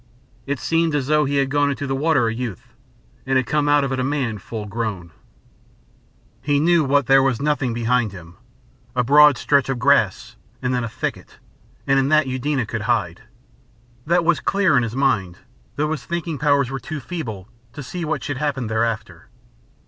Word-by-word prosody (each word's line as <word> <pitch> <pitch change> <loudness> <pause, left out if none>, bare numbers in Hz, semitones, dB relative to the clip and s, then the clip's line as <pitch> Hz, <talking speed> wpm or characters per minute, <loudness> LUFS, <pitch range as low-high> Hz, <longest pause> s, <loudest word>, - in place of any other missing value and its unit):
It 140 0 -1
seemed 165 -1 0
as 140 -3 0
though 150 +1 +2
he 140 +1 -1
had 135 -1 +1
gone 145 0 +2
into 140 0 -3
the 135 -1 -2
water 145 -4 +2
a 115 - -1
youth, 115 -5 -6 0.5
and 130 -1 +1
come 145 +3 0
out 145 -1 +4
of 135 - -2
it 130 - -1
a - - 0
man 130 -6 -2
full 110 +2 -7
grown. 100 -5 -4 1.3
He 145 +1 +1
knew 170 +1 +3
what 140 0 +2
there 135 +2 +5
was 135 -3 +1
behind 125 -5 0
him. 90 -2 -12 0.6
A 125 - +2
broad 145 +2 +6
stretch 140 +1 +1
of 135 - -1
grass, 115 -4 +1 0.2
and 125 -1 -2
then 125 -1 0
a 115 - -4
thicket, - - -6 0.5
and 135 0 +3
in 135 +1 +1
that 155 -1 +4
Eudena 130 0 -1
could 110 0 -4
hide. 100 -8 0 0.9
That 170 +1 +2
was 170 -1 +3
clear 195 -6 +2
in 125 - +4
his 115 0 -4
mind, 110 -10 0 0.4
though 150 +2 -1
his 150 -5 -3
thinking 165 +1 -4
powers 140 -3 +2
were 135 - -4
too 150 +5 -6
feeble 120 - -6 0.3
to 145 - -7
see 175 +6 -6
what 155 - -2
should 145 -3 -4
happen 135 -3 -2
thereafter. 110 -5 -3
135 Hz, 185 wpm, -21 LUFS, 115-145 Hz, 1.3 s, broad